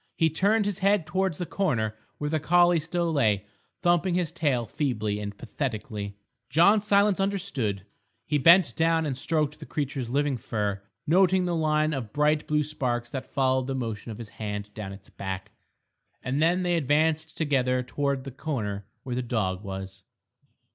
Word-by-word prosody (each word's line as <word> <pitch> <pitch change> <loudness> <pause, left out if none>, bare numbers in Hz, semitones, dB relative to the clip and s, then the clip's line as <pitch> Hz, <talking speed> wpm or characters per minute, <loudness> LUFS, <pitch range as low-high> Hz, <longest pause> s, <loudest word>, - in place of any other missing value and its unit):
He 160 -1 +2
turned 205 +6 +2
his 205 -3 -2
head 195 -3 +3
towards 185 0 0
the 175 - -3
corner 115 - 0 0.2
where 150 0 -3
the 155 - +1
collie 175 +2 +4
still 165 +1 -1
lay, 105 -8 +2 0.4
thumping 175 0 +3
his 175 -3 0
tail 145 -8 0
feebly 110 -6 -1
and 105 -1 -5
pathetically. 105 -6 -4 0.3
John 175 - +5
Silence 200 -1 +3
understood. 180 - -1 0.4
He 150 0 +1
bent 165 -2 +6
down 165 0 +2
and 140 -3 -1
stroked 150 +2 -1
the - - -9
creature's 135 -5 -3
living 140 0 +1
fur, 105 -4 -2 0.2
noting 185 +3 +4
the 175 -1 0
line 155 -1 +2
of 120 -6 -4
bright 150 +1 +2
blue 150 0 +2
sparks 120 -5 -2
that 130 -1 -5
followed 130 -1 +1
the 135 - -2
motion 115 -3 -4
of 110 - -6
his 115 -3 -8
hand 105 -1 -5
down 105 -3 -6
its 100 0 -12
back. 95 -1 -5 0.7
And 135 +3 -1
then 175 +3 +3
they 175 -1 +2
advanced 160 +2 +1
together 130 -4 +1
towards 140 +1 -1
the 135 - -7
corner 110 -9 -4 0.2
where 125 - -4
the 125 - 0
dog 105 -6 -1
was. 95 -1 -7
145 Hz, 170 wpm, -27 LUFS, 115-165 Hz, 0.7 s, bent